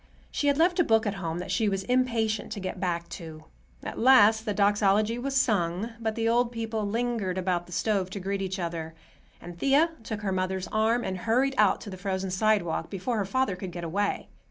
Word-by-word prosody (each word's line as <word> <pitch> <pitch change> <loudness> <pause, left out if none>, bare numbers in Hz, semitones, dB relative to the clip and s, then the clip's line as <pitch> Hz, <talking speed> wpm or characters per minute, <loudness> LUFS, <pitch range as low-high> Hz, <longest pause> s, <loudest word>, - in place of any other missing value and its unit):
She 290 - -1
had 285 -1 +3
left 345 +3 +3
a - - +6
book 225 -5 +3
at 205 - 0
home 165 -1 -3
that 180 - -5
she 220 -3 +2
was 195 -1 -2
impatient 230 -3 0
to 210 - -6
get 185 0 -5
back 170 -2 -2
to. 160 -3 -9 0.4
At - - -6
last 225 -3 +6
the 210 - -1
Doxology 205 +2 +2
was 270 +2 -3
sung, 205 -3 0
but 220 -1 -2
the 225 -1 0
old 235 +1 +2
people 225 -2 -3
lingered 225 -4 -1
about 180 -2 -1
the - - -14
stove 195 0 0
to 200 - -6
greet 195 +1 -3
each 190 0 -3
other, 165 -2 -4 0.4
and 175 0 -10
Thea 285 - +3
took 220 -1 -5
her 200 -2 -2
mother's 185 0 -2
arm 225 +3 +1
and 185 -1 -3
hurried 250 +7 +1
out 210 -4 +3
to 205 - -8
the 185 - -7
frozen 190 0 -3
sidewalk, 185 -5 +1
before 210 +5 -2
her 205 - 0
father 260 0 0
could 185 0 -7
get 175 0 -7
away. 200 +5 -2
205 Hz, 215 wpm, -27 LUFS, 185-230 Hz, 0.4 s, a